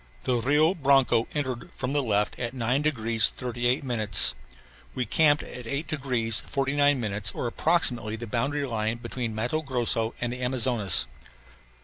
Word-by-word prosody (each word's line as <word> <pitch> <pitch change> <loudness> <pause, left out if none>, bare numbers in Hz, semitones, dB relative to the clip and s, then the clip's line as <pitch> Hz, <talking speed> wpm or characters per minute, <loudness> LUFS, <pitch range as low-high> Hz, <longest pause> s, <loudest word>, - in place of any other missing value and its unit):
The 125 -1 0
Rio 150 +8 +2
Branco 135 -7 +2
entered 130 -5 -4
from 130 +1 -4
the 145 - +1
left 105 -4 -1
at 120 +1 -4
9 125 +3 0
degrees 115 -6 +2
38 125 +1 -2
minutes. 110 -6 +3 0.6
We 125 - -2
camped 145 +5 +3
at 125 -2 -9
8 140 +6 -3
degrees 125 -7 0
49 140 0 +1
minutes 105 -2 +2
or - - -4
approximately 120 -4 +1
the 115 +1 -7
boundary 140 +6 -2
line 110 -2 -2
between 120 -1 -5
Matto 120 +8 -2
Grosso 120 -5 -1
and 120 0 -3
Amazonas. 125 -5 +2
125 Hz, 145 wpm, -26 LUFS, 115-140 Hz, 0.6 s, minutes